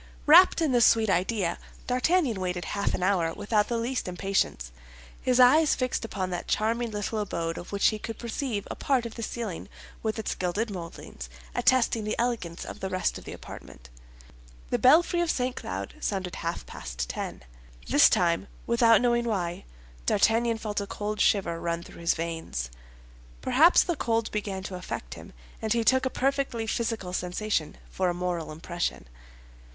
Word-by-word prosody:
Wrapped 340 +4 +7
in 305 - +2
this 240 -2 +6
sweet 220 -3 +3
idea, 185 0 0 0.3
D'Artagnan 255 - +1
waited 180 -1 -2
half 200 -1 -1
an 180 - -3
hour 180 -4 +2
without 210 0 +1
the 235 - -1
least 240 +1 -2
impatience, 180 - -1 0.5
his 255 0 +2
eyes 295 +5 +6
fixed 255 -2 -1
upon 190 -4 -3
that 175 - -4
charming 230 +2 0
little 210 +1 -3
abode 170 -5 -2
of 175 - -8
which 200 0 +3
he 215 - -4
could 225 +1 -6
perceive 235 -3 -3
a - - -4
part 260 -4 +1
of 230 - -6
the 230 - -7
ceiling 220 -5 -5 0.3
with 220 0 -2
its 220 - -2
gilded 200 +5 -2
moldings, 170 - -8 0.2
attesting 235 -3 +2
the 215 - -1
elegance 230 -8 -2
of - - -8
the 190 - -3
rest 185 -1 -1
of - - -16
the - - -7
apartment. - - -11 0.8
The - - +1
belfry 340 +6 +5
of 345 - 0
St. 250 -2 0
Cloud 95 +2 -5
sounded 190 -3 -3
half 170 +1 -4
past - - -5
ten. - - -5 0.4
This - - +6
time, 170 +2 +1 0.2
without 230 -1 +5
knowing 240 -1 +2
why, 180 -6 -2 0.4
D'Artagnan 230 +2 +3
felt 210 -2 -3
a 200 - -5
cold 210 +1 -3
shiver 170 -5 +2
run 170 0 -2
through 170 - -12
his 170 - +2
veins. 165 - -4 0.7
Perhaps 330 +6 +5
the 345 - -1
cold 230 -5 0
began 200 -3 -3
to 190 - -6
affect 120 - -6
him, - - -11 0.3
and 220 0 +1
he 235 -1 +1
took 260 +2 +3
a - - -1
perfectly 270 -4 -1
physical 220 -5 -2
sensation 180 -2 -2
for 185 -1 0
a 175 - -2
moral 175 -3 -3
impression. 165 - -4
210 Hz, 175 wpm, -27 LUFS, 180-235 Hz, 0.8 s, Wrapped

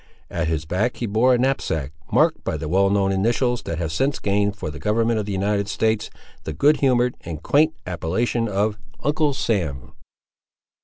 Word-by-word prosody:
At 85 -1 -1
his 80 -1 -1
back 105 +10 -1
he 120 - -2
bore 115 +4 +3
a - - +2
knapsack, 120 - -1 0.2
marked - - +3
by - - -2
the 75 - -5
well 95 +4 +3
known 100 -1 +2
initials 120 +5 +1
that 85 - -3
have 80 -2 -2
since 135 - 0
gained 100 0 0
for 80 -7 -5
the 75 - -9
government 115 +1 +1
of 105 - -4
the - - -3
United 100 +1 0
States 110 0 0 0.3
the - - -4
good 150 +2 +4
humoured 125 -2 +2
and 80 -3 -7
quaint 155 +2 +3
appellation 95 +7 -1
of 105 +1 0 0.2
Uncle 150 -1 +1
Sam. 85 - -2
105 Hz, 185 wpm, -22 LUFS, 90-120 Hz, 0.3 s, good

